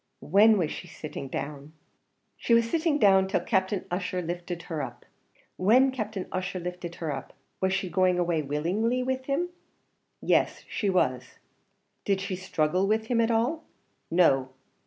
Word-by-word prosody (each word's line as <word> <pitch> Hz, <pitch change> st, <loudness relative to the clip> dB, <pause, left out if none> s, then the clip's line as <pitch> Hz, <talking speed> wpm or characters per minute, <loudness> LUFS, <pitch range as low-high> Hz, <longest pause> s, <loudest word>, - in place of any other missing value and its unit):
"When 210 Hz, +6 st, +5 dB
was 170 Hz, -5 st, 0 dB
she 180 Hz, -, -7 dB
sitting 155 Hz, -4 st, -7 dB
down?" 140 Hz, +2 st, -6 dB, 0.6 s
"She 235 Hz, -, +2 dB
was 230 Hz, 0 st, +3 dB
sitting 320 Hz, +2 st, +1 dB
down 190 Hz, -6 st, +5 dB
till 190 Hz, -, 0 dB
Captain 190 Hz, -2 st, 0 dB
Ussher 185 Hz, 0 st, -2 dB
lifted 175 Hz, 0 st, -5 dB
her 160 Hz, -3 st, -4 dB
up." 120 Hz, -3 st, -7 dB, 0.5 s
"When 250 Hz, +8 st, +5 dB
Captain 215 Hz, -6 st, -4 dB
Ussher 185 Hz, 0 st, -3 dB
lifted 180 Hz, -1 st, -6 dB
her 160 Hz, -3 st, -3 dB
up, 135 Hz, -, -9 dB, 0.3 s
was 190 Hz, 0 st, +2 dB
she 195 Hz, 0 st, -1 dB
going 185 Hz, 0 st, +2 dB
away 170 Hz, -3 st, +1 dB
willingly 185 Hz, -, 0 dB
with 260 Hz, 0 st, -2 dB
him?" 295 Hz, +6 st, 0 dB, 0.7 s
"Yes, -, -, +1 dB
she 205 Hz, -, -1 dB
was." 130 Hz, -9 st, 0 dB, 0.7 s
"Did 195 Hz, -1 st, +1 dB
she 195 Hz, -1 st, -3 dB
struggle 185 Hz, 0 st, 0 dB
with 220 Hz, +1 st, +1 dB
him 235 Hz, -2 st, +3 dB
at 225 Hz, -, +2 dB
all?" 245 Hz, +8 st, +1 dB, 0.5 s
"No." 135 Hz, -7 st, +3 dB
185 Hz, 155 wpm, -27 LUFS, 170-220 Hz, 0.7 s, When